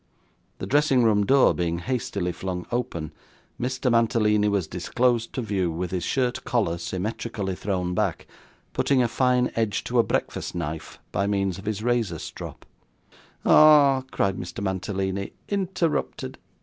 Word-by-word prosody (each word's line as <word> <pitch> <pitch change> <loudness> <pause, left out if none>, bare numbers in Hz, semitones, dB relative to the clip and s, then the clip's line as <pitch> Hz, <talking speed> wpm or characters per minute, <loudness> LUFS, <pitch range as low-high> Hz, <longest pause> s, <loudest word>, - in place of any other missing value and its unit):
The - - -5
dressing 140 -3 +3
room 105 -3 +3
door 135 0 +5
being 85 -1 -1
hastily 100 -4 -2
flung 90 0 -4
open, 115 -11 -2 0.5
Mr. 130 +1 0
Mantalini 110 -3 +3
was 100 -4 +1
disclosed 115 +8 0
to 130 - -2
view, 95 -5 0
with 85 +2 -4
his 90 -2 -2
shirt 130 -1 0
collar 100 -9 0
symmetrically 95 +2 -3
thrown 90 -2 -2
back: 95 -2 -1 0.5
putting 135 -3 +2
a - - +2
fine 125 +1 +2
edge 110 -3 0
to 120 0 0
a - - +6
breakfast - - -2
knife 80 -2 -5
by 100 +2 0
means 100 -2 0
of 100 - -11
his 105 0 -2
razor 115 -8 0
strop. - - -8 0.8
'Ah!' 145 -3 +7
cried 95 -6 0
Mr. 90 +3 -6
Mantalini, 95 0 -2 0.2
'interrupted! 190 -5 -1
105 Hz, 145 wpm, -25 LUFS, 95-125 Hz, 0.8 s, Ah